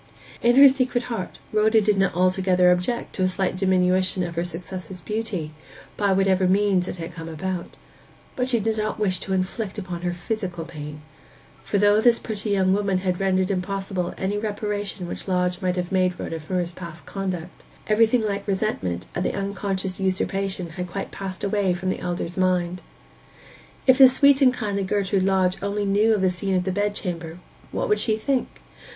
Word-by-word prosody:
In 240 +1 +4
her 280 +1 +10
secret 255 -2 +1
heart 185 -6 -5 0.2
Rhoda 215 +1 +4
did 210 0 +2
not 195 -3 +1
altogether 185 0 +3
object 180 +7 -1
to - - -3
a 185 - +4
slight 185 0 -1
diminution 185 0 +2
of 170 -1 -4
her 170 +1 -1
successor's 180 +1 -6
beauty, 190 -3 -3 0.4
by 200 -2 +1
whatever 190 -1 +3
means 190 -1 +2
it - - -4
had 165 -1 -7
come 165 -1 -7
about; 175 +2 -4 0.6
but 250 0 -1
she 240 -2 +3
did 220 +1 -1
not 215 0 -2
wish 190 -3 +1
to - - -6
inflict 190 +3 -2
upon 180 -4 -5
her 175 0 -1
physical 175 -2 -4
pain. 150 -2 -8 0.6
For 200 - -1
though 205 +1 +4
this 235 0 +5
pretty 215 -1 -4
young 190 -2 +3
woman 200 -1 +1
had 180 -1 0
rendered 190 -1 +1
impossible 190 -1 -2
any 200 +2 -1
reparation 205 -3 -3
which - - -6
Lodge 180 0 0
might 180 -1 0
have 180 0 -3
made 185 -1 +1
Rhoda 165 - -4
for 170 +4 -3
his 175 -1 -1
past 170 -2 -10
conduct, 185 -3 -5 0.2
everything 225 +2 +3
like 200 -1 -2
resentment 140 - -1
at - - -2
the - - -1
unconscious 195 -1 -3
usurpation 190 -1 -1
had 180 +1 -5
quite 195 +2 -5
passed 190 -1 -6
away 200 -2 +1
from 185 +1 -2
the - - -4
elder's 175 0 -4
mind. 180 -1 +1 1.0
If 260 0 +5
the 265 -1 +10
sweet 280 +1 +4
and 260 -2 +7
kindly 210 -5 -2
Gertrude 195 0 0
Lodge 190 -1 +2
only 200 +1 -1
knew 210 +3 +3
of 205 - -1
the 185 -1 +3
scene 190 +1 -2
in 180 - +1
the 190 - -1
bed 205 +2 0
chamber, 170 -4 -4 0.3
what - - -1
would 425 -2 +2
she 220 -2 +1
think? 255 +3 -2
190 Hz, 190 wpm, -24 LUFS, 180-205 Hz, 1.0 s, her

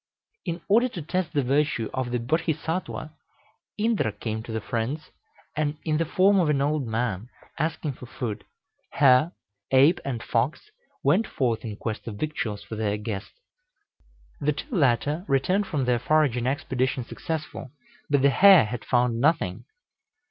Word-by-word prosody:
In 170 -2 -3
order 235 +5 +4
to 180 - -6
test 180 +2 -2
the 145 - +1
virtue 135 -3 +1
of 130 -2 -2
the 125 - 0
Bodhisattwa, 160 +4 -2 0.6
Indra 215 - +1
came 110 +1 -4
to 115 - -8
the 110 - -1
friends, 120 +8 -3 0.4
in 150 0 -1 0.2
the 165 - +1
form 195 +4 +4
of 170 -4 +2
an 145 -2 +2
old 145 -1 0
man, 110 -1 -2 0.3
asking 155 -1 -1
for 125 - -11
food. 115 -3 -5 0.5
Hare, 140 +4 +5 0.4
ape, 140 +7 +5
and 125 -5 -4
fox 135 - -1 0.3
went 225 - +3
forth 115 -4 -1
in 110 -2 -5
quest 110 +1 -5
of 110 - -5
victuals 110 -5 -3
for 110 - -7
their 105 -1 -1
guest. 105 -1 -5 1.1
The 150 +1 +1
two 250 - -6
latter 145 +2 +2
returned 185 +9 +1
from 140 -4 -1
their 125 -1 +2
foraging 130 -4 +2
expedition 130 -1 -1
successful, 155 -1 -5 0.4
but 145 -2 +2
the 140 - +6
hare 190 - +7
had 115 +2 -5
found 120 -2 +1
nothing. 160 +5 +1
135 Hz, 155 wpm, -26 LUFS, 120-160 Hz, 1.1 s, hare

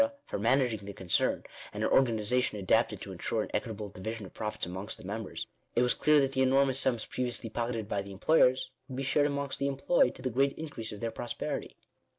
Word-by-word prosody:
for - - -4
managing 120 0 +2
the 100 0 -8
concern, 95 -2 +1 0.3
and - - -3
an - - +2
or - - +7
ganization 115 -1 +1
adapted 95 -3 +2
to - - -7
ensure - - -1
an - - -8
equitable 105 -2 -2
division 105 +3 -6
of 95 - -12
profits 105 0 -3
amongst 95 +5 -4
the - - -12
members, 100 +2 -4 0.3
it 120 - +4
was 125 - +3
clear 150 -1 +4
that 135 -1 +2
the 130 - +1
enormous 135 0 +4
sums 125 -5 +1
previously 120 -2 -2
pocketed 115 -3 -2
by 100 -1 -1
the 100 0 -9
employers, 130 +4 +3 0.2
would 130 - -6
be 135 - -2
shared 145 +2 +3
amongst 140 -1 -2
the 140 - +1
employed 135 0 +2
to - - -12
the 130 - -1
great 135 +4 +2
increase 145 -8 -4
of 105 - -8
their 115 -1 -1
prosperity. 120 - -4
120 Hz, 215 wpm, -30 LUFS, 105-135 Hz, 0.3 s, or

